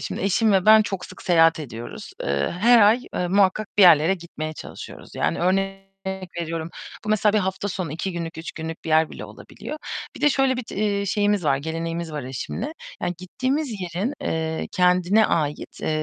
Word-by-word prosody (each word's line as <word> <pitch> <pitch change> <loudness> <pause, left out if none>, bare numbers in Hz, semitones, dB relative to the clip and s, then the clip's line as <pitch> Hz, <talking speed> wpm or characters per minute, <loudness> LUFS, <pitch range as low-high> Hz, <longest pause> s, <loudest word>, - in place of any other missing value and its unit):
Şimdi - - -4
eşim 200 +3 +2
ve 190 -1 +2
ben 215 0 +8
çok 195 -3 -4
sık 185 - -13
seyahat 165 -2 +4
ediyoruz. 120 -4 -8
Eee, 70 0 0
her 235 +1 +7
ay, 215 +4 +5
eee, 180 - -1
muhakkak 200 +2 +2
bir - - +8
yerlere 170 0 +7
gitmeye 165 -3 -6
çalışıyoruz - - -10
yani - - 0
örnek 195 +2 0 0.5
veriyorum, 165 0 -4 0.3
bu - - -6
mesela 215 -1 +3
bir 215 - +3
hafta 190 +1 -2
sonu 180 -6 -4
2 180 +4 -3
günlük, 165 -1 -5
3 165 - -6
günlük 160 0 -7
bir - - -6
yer 160 0 +3
bile - - -8
olabiliyor. 305 - -9 0.4
Bir - - -10
de 295 - +5
şöyle 270 -2 +2
bir, 255 - -3
c - - -9
eee, 200 -1 0
şeyimiz 205 -2 +1
var, 135 -2 +3
geleneğimiz 165 +2 -4
var 150 -1 -4
eşimle 135 - -5 0.3
yani 175 - -1
gittiğimiz 260 - -2
yerin, 180 - -2
eee, 160 0 -2
kendine 180 +3 +4
ait, 150 -3 -2
eee, - - -2
180 Hz, 190 wpm, -23 LUFS, 160-205 Hz, 0.5 s, ben